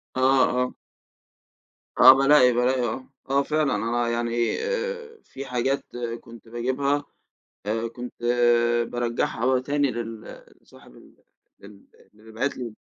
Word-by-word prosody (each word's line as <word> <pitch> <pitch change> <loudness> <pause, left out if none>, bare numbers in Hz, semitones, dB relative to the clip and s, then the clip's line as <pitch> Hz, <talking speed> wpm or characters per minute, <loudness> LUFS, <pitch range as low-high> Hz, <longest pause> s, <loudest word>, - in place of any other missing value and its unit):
آه، 130 - -1 0.4
آه. 125 - -4 1.3
آه، 130 +1 +10
بالاقي، 135 -2 +5
بالاقي 125 +2 +1
آه، 125 +3 -5 0.2
آه 140 +1 +2
فعلًا 155 -2 0 0.3
آه - - -1
يعني 120 0 -1
آآ، 470 -1 -4
في 135 - -9
حاجات 130 +2 -1 0.4
كنت 115 0 -15
باجيبها 130 +5 -1 0.6
آآ، 115 +2 -1
كنت 120 +1 -9 0.8
بارجعها 120 -2 -2
عل 130 -1 +1
تاني 145 0 0
لل 115 -2 -7 0.2
لصاحب - - -19
ال - - -19 1.0
اللي 110 +1 -16
باعت 125 +6 -2
لي 120 -4 -6
125 Hz, 120 wpm, -24 LUFS, 115-140 Hz, 1.3 s, آه